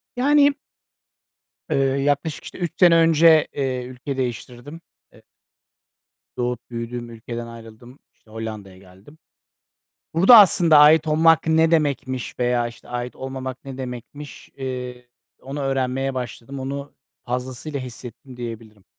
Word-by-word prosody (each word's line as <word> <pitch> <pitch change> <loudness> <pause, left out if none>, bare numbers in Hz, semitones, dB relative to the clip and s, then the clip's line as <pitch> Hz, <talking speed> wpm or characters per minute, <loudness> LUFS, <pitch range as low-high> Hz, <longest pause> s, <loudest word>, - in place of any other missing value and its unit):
Yani 285 +3 +4 1.2
Eee, - - +1 0.2
yaklaşık, 145 +2 -1
işte, - - -10
3 175 -4 -3
sene 175 -2 +6
önce, 165 -1 +5
iii, 130 -3 -3
ülke 130 +2 -6
değiştirdim. 125 +4 -6 0.3
E - - -19 1.2
Doğup 125 0 -3
büyüdüğüm 120 0 -6
ülkeden 115 +1 -7
ayrıldım, 115 +3 -13
işte, 110 - -25
Hollanda'ya 110 -4 -7
geldim. 95 +10 -18 1.0
Burada 190 +8 +8
aslında 170 -5 +6
ait 150 +2 +6
olmak 160 +1 +4
ne 160 0 +3
demekmiş 140 -5 -1
veya, 120 -1 +1
işte, 120 - -16
ait 125 0 -5
olmamak 130 -1 -7
ne 135 -1 -8
demekmiş, 130 +3 -9
ııı, 125 -2 -5 0.5
onu 140 +2 -6
öğrenmeye 135 0 -1
başladım. 125 +1 -6
Onu 140 +2 -6 0.3
fazlasıyla 130 +4 -4
hissettim 125 +1 -10
diyebilirim. 115 -4 -9
130 Hz, 120 wpm, -22 LUFS, 120-150 Hz, 1.2 s, Burada